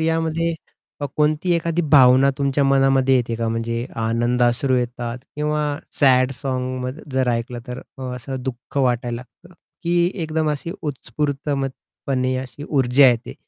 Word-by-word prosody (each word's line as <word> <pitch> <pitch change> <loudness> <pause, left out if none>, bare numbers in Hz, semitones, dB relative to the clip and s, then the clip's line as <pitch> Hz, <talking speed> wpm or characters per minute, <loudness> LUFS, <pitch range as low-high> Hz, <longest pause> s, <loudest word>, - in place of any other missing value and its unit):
यामध्ये 165 +1 0 0.5
अ, - - -2
कोणती 155 +4 +2
एखादी 170 +1 0
भावना 135 -1 +7
तुमच्या 140 0 +1
मनामध्ये 135 -1 +4
येते 120 -2 -1
का? 115 0 -1
म्हणजे 115 +1 -2
आनंदाश्रू 120 +3 +1
येतात 120 0 -3 0.2
किंवा 150 0 0 0.4
सॅड 130 -1 +5
साँग 130 -1 -3
मध 130 +5 -5
जर 130 -1 +1
ऐकलं 120 +1 -3
तर 125 +1 -6 0.2
अ, - - -7
असं 130 +1 -6
दुःख 130 +1 -7
वाटायला 120 -2 +1
लागतं, 175 +8 -14 0.3
की 175 0 +2 0.2
एकदम 155 -1 0
अशी 150 +3 -4
उत्स्फूर्तपणे 135 -2 -3
अशी 130 +2 -7
ऊर्जा 135 -1 +5
येते 120 -2 -1
130 Hz, 140 wpm, -21 LUFS, 125-150 Hz, 0.5 s, भावना